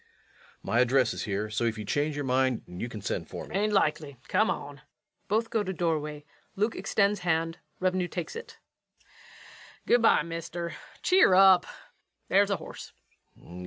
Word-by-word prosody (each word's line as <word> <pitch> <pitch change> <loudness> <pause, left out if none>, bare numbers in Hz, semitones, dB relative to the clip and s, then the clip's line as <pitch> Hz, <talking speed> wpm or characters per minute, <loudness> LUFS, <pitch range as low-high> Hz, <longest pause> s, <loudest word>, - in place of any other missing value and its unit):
My 115 - +1
address 125 0 +3
is - - -4
here, 105 +1 -2
so 110 +2 -1
if 115 -1 -1
you 105 - -6
change 145 +7 -1
your 145 -1 -3
mind 130 -1 +1
you 90 +7 -6
can 110 -3 -8
send - - -3
for - - -6
me. - - -12
LUKE. - - -10
'Tain't 210 +2 +1
likely 150 -7 0
come 215 +4 +2
on. 145 0 -5 0.5
[Both 225 +3 0
go 225 - +1
to 190 -2 -3
doorway 155 -4 -2 0.3
LUKE 215 +3 0
extends 200 +2 +1
hand, 165 -1 -1 0.2
REVENUE 185 -1 0
takes 175 -1 -5
it.] 465 +1 -9 1.3
Good 240 - +4
by, 225 - +5
mister 170 +1 -5 0.3
cheer 365 - +5
up... 190 -2 +6 0.6
there's 200 +1 +4
the 200 - +1
horse. - - -10 0.4
REVENUE. 90 +1 -12
165 Hz, 170 wpm, -28 LUFS, 135-195 Hz, 1.3 s, up